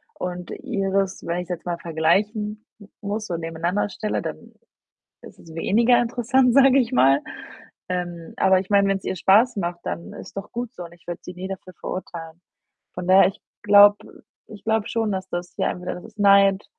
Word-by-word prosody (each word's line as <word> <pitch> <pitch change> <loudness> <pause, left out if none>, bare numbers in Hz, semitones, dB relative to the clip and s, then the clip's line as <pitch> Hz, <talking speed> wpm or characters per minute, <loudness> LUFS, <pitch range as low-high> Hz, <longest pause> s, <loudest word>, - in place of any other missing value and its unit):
Und 180 -1 -5
ihres, 195 -6 -2
wenn 170 +1 -2
ich's 180 0 -7
jetzt 175 -1 -5
mal 175 -1 -2
vergleichen 210 +7 -1
m 200 -2 -15
muss, 210 +2 -4
so 170 - -3
nebeneinander 170 +5 -2
stelle, 210 +2 -3
dann - - -8 0.7
ist - - -14
es 165 -1 -14
weniger 235 +7 +3
interessant, 245 +1 +2
sage 270 0 +6
ich 245 -2 0
mal. 135 - +4 0.7
Ähm, 175 -2 -4
aber 190 -1 +4
ich 190 +1 -7
meine, 200 -1 +4
wenn's 195 -1 -1
ihr - - -2
Spaß 215 +7 +4
macht, 175 -2 -3
dann 170 - -5
ist - - -11
doch 195 - -6
gut 240 -1 -5
so, 180 - -8
und 170 - -13
ich 175 +1 -22
würde 175 -1 -5
sie 180 - -8
nie 185 +2 -6
dafür 185 -1 -8
verurteilen. 165 -2 -7 0.5
Von 180 0 -6
daher, 190 +1 +7
ich 195 - -7 0.2
glaube 205 0 +7 0.5
ich 210 -2 -12
glaube 220 -1 +1
schon, 225 -2 -1
dass 190 0 -5
das 175 0 -5
ja, - - +1
entweder 180 0 -5
das 180 - -10
ist 220 -1 -16
Neid 200 -1 +5
195 Hz, 195 wpm, -23 LUFS, 175-215 Hz, 0.7 s, daher